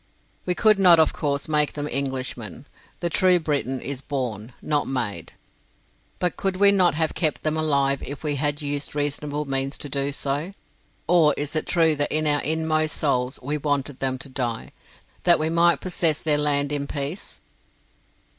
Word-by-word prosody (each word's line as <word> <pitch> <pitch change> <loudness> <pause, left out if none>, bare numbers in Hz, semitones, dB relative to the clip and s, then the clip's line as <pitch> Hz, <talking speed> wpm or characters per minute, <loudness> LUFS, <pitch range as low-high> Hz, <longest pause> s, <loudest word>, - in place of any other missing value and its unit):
We 180 - +1
could 215 0 +4
not, 180 -3 +7
of 160 - +3
course, 140 -1 -2
make 150 -1 +2
them 145 0 -3
Englishmen 130 -6 -3 0.4
the 170 - 0
true 185 +1 +4
Briton 140 -4 -1
is 135 0 -5
born, 125 -6 -4
not 150 -1 0
made; 110 -10 -3 0.8
but 180 -1 -1
could 195 -2 -2
we 200 +1 +6
not 185 -6 +3
have 160 0 0
kept 155 -4 -1
them 155 0 0
alive 140 -3 +1
if 140 +2 -7
we 150 -1 0
had 145 +1 -1
used 145 0 -3
reasonable 145 0 -2
means 135 0 -2
to 145 - -7
do 140 +1 -1
so? 145 +6 -2 0.5
Or 160 -4 +4
is 145 +2 -3
it 155 - -1
true 165 -3 +3
that 145 - -1
in 155 0 +2
our 145 -1 +3
inmost 155 0 0
souls 130 -3 0
we 150 +3 -2
wanted 145 -2 -2
them 130 -1 -1
to 135 - -6
die, 120 -3 -3 0.5
that 175 -1 +5
we 155 +1 -1
might 170 +1 +3
possess 170 -4 0
their 150 -2 +1
land 145 -1 +1
in 140 -1 -2
peace? 145 +7 -4
145 Hz, 175 wpm, -23 LUFS, 140-160 Hz, 0.8 s, not